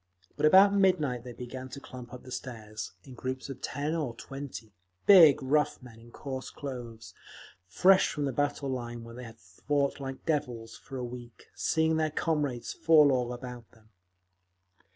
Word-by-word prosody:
But 150 +1 +3
about 195 +4 +7
midnight 180 -11 +2
they 125 - -8
began 130 +2 -8
to 140 - -8
clump 125 -3 -10
up 125 - -10
the 130 - -12
stairs, 110 -5 -6
in 130 - -12
groups 130 +2 -5
of 135 - -8
ten 145 +3 -2
or 145 -8 -2
twenty—big, 135 - +3
rough 150 +3 +1
men, 115 -3 -13
in 115 +1 -15
coarse 130 +1 -6
clothes, 120 -5 -8 0.5
fresh 185 - +5
from 145 -2 -2
the 135 - -2
battle 145 0 -1
line, 120 -2 -5
where 115 0 -10
they 125 +1 -8
had 115 0 -11
fought 140 +11 -2
like 135 -1 -7
devils 120 -8 -2
for 135 - -9
a 125 - -3
week, 120 -1 -10
seeing 160 0 +1
their 155 -1 +1
comrades 145 -6 -1
fall 155 -3 +5
all 125 -2 0
about 125 -2 -8
them. 110 -1 -24
130 Hz, 170 wpm, -29 LUFS, 120-145 Hz, 0.5 s, about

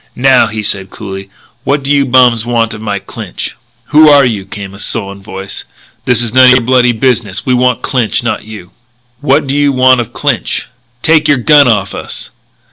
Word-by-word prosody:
"Now," 130 0 +3
he 110 0 -5
said 95 -1 -2
coolly, 95 -1 -8 0.3
"what 140 0 -1
do 140 - -2
you 140 -2 +2
bums 125 -3 +3
want 115 -1 -1
of 110 - -9
Mike 100 -2 -4
Clinch?" - - -6 0.3
"Who 155 +1 +6
are 145 -2 +5
you?" 105 -5 -3
came 100 -1 -8
a 100 - -12
sullen 100 -1 -4
voice. 95 0 -7 0.4
"This 120 -1 +2
is 115 -1 -4
none 130 0 +6
o' - - +7
your 125 - +3
bloody 125 0 +2
business. 115 -4 -1
We 130 - +1
want 125 0 +1
Clinch, 120 -2 -1
not 120 - -2
you." 105 -5 -11 0.5
"What 145 +1 +1
do 135 - -3
you 145 0 +2
want 130 -1 +3
of 115 - -8
Clinch?" - - -2 0.4
"Take 155 -1 +3
your 145 -2 +3
gun 145 +3 +4
off 105 -4 0
us!" - - -7
120 Hz, 200 wpm, -11 LUFS, 105-135 Hz, 0.5 s, o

